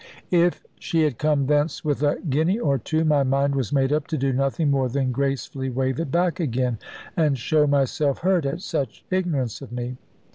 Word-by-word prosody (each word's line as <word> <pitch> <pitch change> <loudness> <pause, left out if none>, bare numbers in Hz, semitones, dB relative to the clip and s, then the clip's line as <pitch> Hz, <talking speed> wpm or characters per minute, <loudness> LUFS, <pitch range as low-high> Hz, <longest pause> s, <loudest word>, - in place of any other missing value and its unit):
If 175 0 +2
she 165 -1 +1
had 145 -7 0
come 150 -2 +2
thence 150 +3 0
with 145 -2 0
a 145 -1 +2
guinea 160 +8 +2
or 140 - +1
two, 155 +7 0
my 150 -2 +3
mind 140 +1 +1
was 135 -6 -1
made 135 0 +2
up 150 -1 0
to 160 - -2
do 135 -1 0
nothing 135 +3 +1
more 135 -2 +1
than 130 0 0
gracefully 135 0 -2
wave 130 +1 -1
it 165 - -2
back 175 +4 +1
again, 125 -6 -1 0.4
and 150 -5 +2
show 150 +5 +2
myself 140 0 +1
hurt 180 -4 +2
at 160 +6 -3
such 145 - -3
ignorance 160 - -1
of - - -9
me. 125 +1 -4
140 Hz, 195 wpm, -24 LUFS, 130-155 Hz, 0.4 s, my